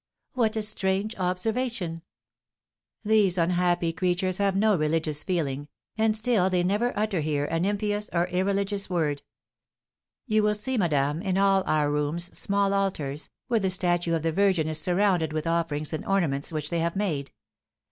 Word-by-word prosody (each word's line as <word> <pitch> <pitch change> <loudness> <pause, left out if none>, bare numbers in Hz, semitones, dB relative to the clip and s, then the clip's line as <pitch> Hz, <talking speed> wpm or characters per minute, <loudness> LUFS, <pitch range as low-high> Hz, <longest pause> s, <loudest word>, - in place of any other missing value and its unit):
'" - - -54
"What 230 -3 +1
a 220 - +1
strange 200 +1 -1
observation!" 185 -1 -2 1.0
"These 205 -4 +3
unhappy 175 -1 +1
creatures 185 +1 0
have 200 -1 +2
no 210 +1 +3
religious 155 -1 0
feeling, 145 -6 -2 0.3
and 220 0 +2
still 215 -5 +2
they 180 -1 +1
never 210 +7 +1
utter 210 -4 0
here 145 -1 0
an 165 +3 -1
impious 205 +1 -1
or 170 0 +1
irreligious 200 +2 -1
word. 155 -5 0 1.0
You 215 -4 +2
will 210 0 +2
see, 255 +5 -2
madame, 150 - +1
in 190 -2 -1
all 195 -1 +4
our 150 -1 +2
rooms 150 +4 -2
small 200 0 0
altars, 155 -8 -2 0.2
where 235 -3 +2
the 190 -2 0
statue 175 -2 +1
of 160 - -2
the 165 - +1
Virgin 185 -3 +2
is 155 0 0
surrounded 180 -2 +1
with 155 0 -2
offerings 165 -2 -1
and 155 - -3
ornaments 165 -8 0
which 155 0 -3
they 170 - 0
have 170 +2 -1
made. 160 -9 -2
180 Hz, 165 wpm, -26 LUFS, 160-200 Hz, 1.0 s, all